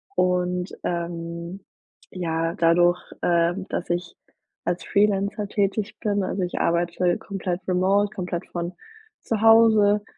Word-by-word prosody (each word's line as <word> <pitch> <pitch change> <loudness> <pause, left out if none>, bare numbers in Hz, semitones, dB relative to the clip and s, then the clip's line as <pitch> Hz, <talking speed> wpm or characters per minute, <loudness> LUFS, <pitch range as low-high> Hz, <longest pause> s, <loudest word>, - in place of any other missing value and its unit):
Und, 180 0 0
ähm, 170 +1 -4 0.5
ja, 165 -2 -2
dadurch, 175 +1 +4 0.2
äh, 170 0 +2 0.2
dass 175 - -3
ich 175 0 -2 0.5
als 175 +1 -2
Freelancer 205 +1 +1
tätig 200 +1 -1
bin, 205 -2 0
also, 185 0 -2
ich 180 - -3
arbeite 175 +1 +1
komplett 185 -2 -4
remote, 195 +3 +2
komplett 180 -3 -4
von 175 +1 -4 0.5
zu 220 -2 -2
Hause, 220 -2 +5
180 Hz, 120 wpm, -24 LUFS, 175-200 Hz, 0.5 s, Hause